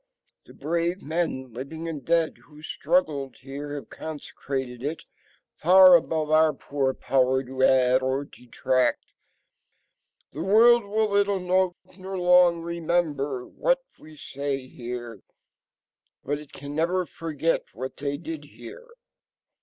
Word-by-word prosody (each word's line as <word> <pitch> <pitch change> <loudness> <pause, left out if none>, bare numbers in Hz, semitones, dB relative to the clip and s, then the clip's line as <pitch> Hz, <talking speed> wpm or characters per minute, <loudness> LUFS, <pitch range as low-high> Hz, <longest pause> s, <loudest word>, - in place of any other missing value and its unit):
The - - -16
brave 170 +5 -2
men, 150 -6 -2
living 160 +7 -6
and 150 -5 -5
dead, 165 -1 +1
who 150 +1 -16
struggled 145 - -1
here 140 +2 -7
have 145 - -8
consecrated 135 -5 -6
it, 150 +4 -4 0.5
far 185 +2 +7
above 160 -2 0
our 155 0 +5
poor 135 -1 -2
power 130 0 +1
to 130 0 -6
add 130 -1 +4
or 130 +2 -1
detract. 130 0 -1 1.3
The 150 - -5
world 225 +5 +5
will 215 +2 +1
little 200 -1 +2
note, 180 0 +1 0.2
nor 190 +1 -6
long 180 -1 +4
remember, 160 -6 -1
what - - 0 0.2
we 155 0 -15
say 140 -1 -4
here, 120 -4 -7 1.0
but 145 +2 -2
it 150 -2 -13
can 140 +1 -8
never 175 +3 +1
forget 165 -1 -2
what 130 +4 -6
they 145 0 -3
did 320 - -7
here. 485 0 -12
150 Hz, 130 wpm, -25 LUFS, 135-175 Hz, 1.3 s, far